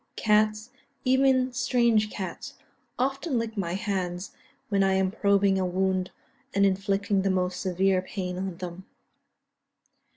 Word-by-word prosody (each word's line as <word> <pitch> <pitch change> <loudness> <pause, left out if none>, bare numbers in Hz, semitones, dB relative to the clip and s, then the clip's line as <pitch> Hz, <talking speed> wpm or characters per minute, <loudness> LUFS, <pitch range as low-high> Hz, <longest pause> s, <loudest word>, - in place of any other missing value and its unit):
Cats, 215 +1 +2 0.3
even 260 -1 +3
strange 240 -4 +2
cats, 190 -4 -6 0.4
often 270 +2 -1
lick 230 -1 -3
my 175 -4 -2
hands 190 -3 -3 0.4
when 200 -2 +2
I 190 0 +3
am 190 0 +1
probing 200 -2 +2
a 185 - 0
wound 185 0 0 0.5
and 200 0 +4
inflicting 195 +1 +1
the 195 - 0
most 180 -1 -1
severe 190 0 +1
pain 185 -1 -5
on 190 -2 -4
them. 180 +1 -7
195 Hz, 130 wpm, -27 LUFS, 185-220 Hz, 0.5 s, and